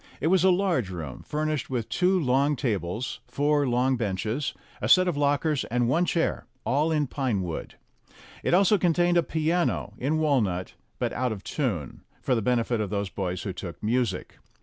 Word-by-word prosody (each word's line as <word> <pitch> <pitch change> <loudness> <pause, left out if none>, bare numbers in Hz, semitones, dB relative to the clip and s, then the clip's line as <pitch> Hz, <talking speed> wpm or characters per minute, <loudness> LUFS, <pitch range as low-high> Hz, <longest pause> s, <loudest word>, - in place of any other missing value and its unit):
It - - 0
was 185 -2 +4
a 190 - +6
large 175 - +1
room, 80 -8 -6
furnished 155 -1 -2
with 120 -4 -2
two 185 +1 +2
long 140 0 +2
tables, 110 - -2
four 145 0 +1
long 125 +2 +2
benches, 110 +5 -2 0.3
a - - -1
set 185 0 +6
of 175 - 0
lockers, 145 0 +1
and 120 +1 0
one 165 +8 +2
chair 170 -1 -1 0.2
all 150 +5 +2
in 150 -2 +2
pine 125 -7 -1
wood. 85 -3 -5 0.7
It - - +2
also 195 +2 +4
contained 175 0 +3
a - - +6
piano, 165 +2 0
in 145 +5 0
walnut, 115 - +1 0.2
but - - -1
out 125 -1 0
of 100 -3 -6
tune, 105 - -3 0.2
for 130 - 0
the 115 - +1
benefit 120 0 +1
of 105 - -2
those 100 -1 -2
boys 90 -2 -3
who 95 - -3
took 90 0 -8
music. 110 -4 -1
130 Hz, 180 wpm, -26 LUFS, 105-155 Hz, 0.7 s, a